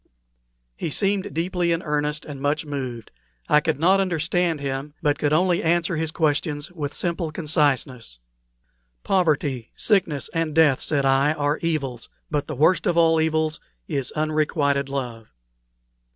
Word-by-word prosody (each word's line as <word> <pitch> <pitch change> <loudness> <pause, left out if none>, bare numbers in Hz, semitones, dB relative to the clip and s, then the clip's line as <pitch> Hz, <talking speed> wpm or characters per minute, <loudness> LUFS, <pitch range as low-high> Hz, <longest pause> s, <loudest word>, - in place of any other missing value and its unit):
He - - -3
seemed 195 +4 0
deeply 175 +2 -1
in 165 +1 0
earnest 150 0 -2
and 140 -3 -8
much 150 +2 0
moved. 130 -6 -5 0.4
I 150 - +5
could 150 -2 -1
not 185 +4 +4
understand 175 -2 0
him, 140 +1 -4
but 145 -1 +1
could 145 -1 +1
only 175 +2 +2
answer 170 +1 +1
his 160 0 -1
questions 150 -1 -1
with 150 -5 -5
simple 170 -2 -2
conciseness. 140 - 0 0.9
"Poverty, 145 -9 0
sickness, 170 - +1
and 165 -2 -1
death," 155 -5 +5
said 140 -3 +1
I, 135 +3 +3
"are 145 -1 -1
evils; 140 -8 -3 0.2
but 145 -2 -1
the 155 - -4
worst 160 +7 +3
of 170 - +1
all 165 -1 +4
evils 160 0 0 0.3
is 135 -2 -2
unrequited 150 -2 0
love." 120 -5 -5
150 Hz, 145 wpm, -23 LUFS, 140-165 Hz, 0.9 s, I